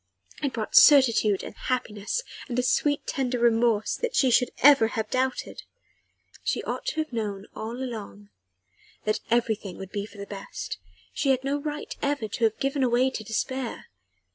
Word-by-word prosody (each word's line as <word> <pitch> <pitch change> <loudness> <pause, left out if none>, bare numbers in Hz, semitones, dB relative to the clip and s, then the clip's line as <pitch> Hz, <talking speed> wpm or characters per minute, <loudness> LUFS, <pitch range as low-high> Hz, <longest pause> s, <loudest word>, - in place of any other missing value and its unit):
It 280 -3 -1
brought 220 -2 -4
certitude 230 -8 +6
and - - -7
happiness, 245 - -2 0.3
and 240 - -3
a 250 - +2
sweet, 290 +3 +1
tender 255 -2 -1
remorse 230 -2 +2
that 485 - -3
she 260 -2 +4
should 250 +1 +4
ever 275 -5 +8
have 220 -1 -4
doubted. 260 0 -1 0.8
She - - -1
ought - - -4
to - - -1
have 310 - -19
known 205 -3 -3
all 220 +1 -5
along 210 - -7 0.7
that 215 0 0
everything 220 -5 0
would 190 0 -8
be 205 -1 -3
for 205 - -16
the 200 - -6
best: 200 - -7 0.3
she 275 - 0
had 260 -1 +2
no 280 +2 -1
right 300 0 -5
ever 280 -6 -1
to 230 +2 0
have 220 -1 +1
given 275 -2 0
way 250 +2 +3
to 220 - -5
despair. 240 +4 -3
240 Hz, 170 wpm, -26 LUFS, 215-265 Hz, 0.8 s, ever